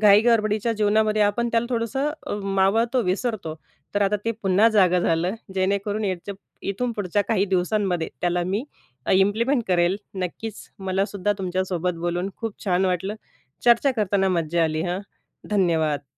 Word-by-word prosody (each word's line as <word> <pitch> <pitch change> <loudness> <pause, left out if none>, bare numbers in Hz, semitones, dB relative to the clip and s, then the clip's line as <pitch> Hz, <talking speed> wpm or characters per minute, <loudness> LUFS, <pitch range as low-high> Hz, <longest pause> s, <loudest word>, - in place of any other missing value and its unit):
घाई-गडबडीच्या 215 +1 +4
जीवनामध्ये 215 0 +2
आपण 235 +4 +1
त्याला 230 0 +2
थोडंसं 245 +5 0 0.2
अ, - - -3
मावळतो, 195 +6 +2
विसरतो. 195 -3 -2 0.4
तर 205 - +2
आता 200 +1 +2
ते 230 - +1
पुन्हा 195 +3 +4
जागं 185 -5 +4
झालं. 175 +4 +1 0.2
जेणेकरून 200 +3 0
याच्या 190 +1 -3 0.4
इथून 245 +4 -2
पुढच्या 205 -1 0
काही 205 -4 +2
दिवसांमध्ये 180 -2 0
त्याला 175 0 +1
मी 205 +6 -1 0.5
इम्प्लिमेंट 225 +7 +3
करेल. 175 +1 +3 0.2
नक्कीच 190 +4 -5 0.2
मलासुद्धा 195 +1 -1
तुमच्यासोबत 180 -1 -1
बोलून 175 +2 -1
खूप 225 -3 -6
छान 185 -1 +2
वाटलं. 185 +3 -1 0.5
चर्चा 240 +3 +5
करताना 200 -2 +2
मज्जा 170 -2 +1
आली 155 0 -1
हां, 180 +1 -2 0.5
धन्यवाद. 165 -7 +1
195 Hz, 135 wpm, -24 LUFS, 180-215 Hz, 0.5 s, चर्चा